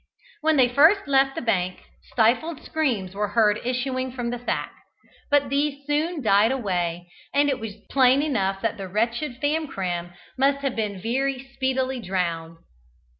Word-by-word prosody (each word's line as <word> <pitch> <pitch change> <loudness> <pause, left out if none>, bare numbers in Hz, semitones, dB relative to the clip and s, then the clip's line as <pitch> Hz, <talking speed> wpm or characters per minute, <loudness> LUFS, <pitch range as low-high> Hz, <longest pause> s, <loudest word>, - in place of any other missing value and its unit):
When 315 0 +3
they 255 -2 +6
first 315 +10 +4
left 270 -1 +3
the - - -4
bank, 185 -5 -1 0.3
stifled 255 +8 +1
screams 235 - -1
were 205 +1 -1
heard 210 0 +2
issuing 255 +1 -2
from 245 -2 -3
the 245 - -4
sack, - - -2 0.6
but 285 -2 +3
these 280 0 -1
soon 300 +1 -1
died 210 +2 +4
away, 175 -8 -2 0.3
and 290 0 +4
it 270 -2 -1
was 220 -3 -6 0.2
plain 265 +1 +4
enough 195 -9 -1
that 225 0 -1
the 195 -1 -6
wretched 235 +6 -2
Famcram 195 - -2 0.3
must 280 +1 +2
have 270 -2 -1
been 210 -3 -2
very 265 +5 -2
speedily 260 -1 -1
drowned. 170 -5 -3
250 Hz, 155 wpm, -24 LUFS, 200-275 Hz, 0.6 s, they